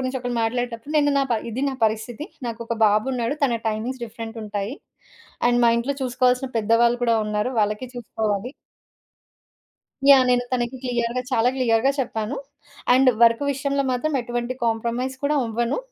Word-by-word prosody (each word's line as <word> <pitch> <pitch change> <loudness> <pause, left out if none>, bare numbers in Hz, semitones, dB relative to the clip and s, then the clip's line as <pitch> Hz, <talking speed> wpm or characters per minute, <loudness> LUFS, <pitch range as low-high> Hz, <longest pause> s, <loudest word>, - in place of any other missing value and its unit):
గురించి 260 0 -2
ఒకళ్ళు 245 -1 -3
మాట్లాడేటప్పుడు, 240 +3 -3
నేను 290 -1 +3
నా - - +3
ప - - +4 0.2
ఇది 255 +5 -3
నా 265 - -5
పరిస్థితి 220 +6 -4 0.2
నాకు 230 0 -5
ఒక 235 - -2
బాబున్నాడు, 235 +5 0
తన 240 -4 +1
టైమింగ్స్ 240 +4 -3
డిఫరెంటుంటాయి. 225 -1 -5 0.7
అండ్ 245 0 +3
మా 235 - +6
ఇంట్లో 275 +4 -2
చూసుకోవాల్సిన 250 +1 +1
పెద్దవాళ్ళు 235 +2 +3
కూడా 230 -1 +3
ఉన్నారు, 210 +4 -1
వాళ్ళకి 210 +4 -1
చూసుకోవాలి. 220 0 -3 1.6
యాహ్! 270 -2 +8
నేను 245 0 +3
తనకి 250 0 -1
క్లియర్‌గా, 240 0 -1
చాలా 245 0 +3
క్లియర్‌గా 245 +1 +3
చెప్పాను. 230 +1 -2 0.6
అండ్ 260 0 +5
వర్కు 230 +4 +4
విషయంలో 280 0 -1
మాత్రం 295 +5 -1
ఎటువంటి 240 +1 -3
కాంప్రమైజ్ 235 +3 -1
కూడా 295 +1 +2
అవ్వను 235 +2 -1
240 Hz, 145 wpm, -23 LUFS, 225-255 Hz, 1.6 s, యాహ్